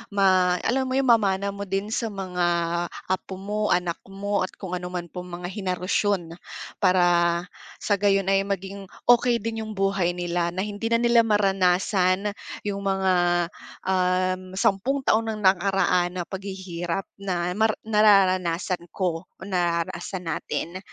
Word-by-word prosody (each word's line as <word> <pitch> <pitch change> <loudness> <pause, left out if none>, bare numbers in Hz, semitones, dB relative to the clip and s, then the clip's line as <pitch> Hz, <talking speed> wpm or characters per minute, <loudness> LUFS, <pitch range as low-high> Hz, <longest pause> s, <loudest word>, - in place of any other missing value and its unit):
ma 185 -2 +4
alam 265 +2 +1
mo 255 - -1
yung 270 0 +2
mamana 200 -3 +2
mo 200 - -5
din 195 +2 -2
sa 230 0 -1
mga 180 -3 -2 0.6
apo 190 0 -2
mo, 210 +2 -2
anak 175 -1 0
mo, 200 +1 -1
at - - -4
kung 190 -3 -6
ano 180 0 -5
man 175 -1 -4
pong 180 0 -7
mga 175 +1 -5
henerasyon. 185 -2 -1 0.5
Para 175 -2 +3 0.4
sa 205 - +2
gayon 195 -1 +2
ay 195 0 +3
maging 195 0 -4 0.2
okey 240 0 +4
din 225 0 -3
yung 215 - -6
buhay 195 -2 +1
nila 175 -1 -1
na 190 - -1
hindi 205 +2 -4
na 230 - +4
nila 235 0 +5
maranasan 195 -1 +2 0.4
yung 200 -1 -2
mga, 190 -1 +1 0.8
um, 185 0 +1
sampung 205 +9 +1
taon 225 -2 +2
ng - - -7
nakaraan 185 -1 +2
na 175 - -1
paghihirap 190 -2 -4
na 180 -3 -2
mara 220 +1 +2
nararanasan 185 -4 +3
ko, 180 -2 -2 0.2
nararanasan 175 0 -2
natin. 175 +3 -4
190 Hz, 145 wpm, -25 LUFS, 180-205 Hz, 0.8 s, nila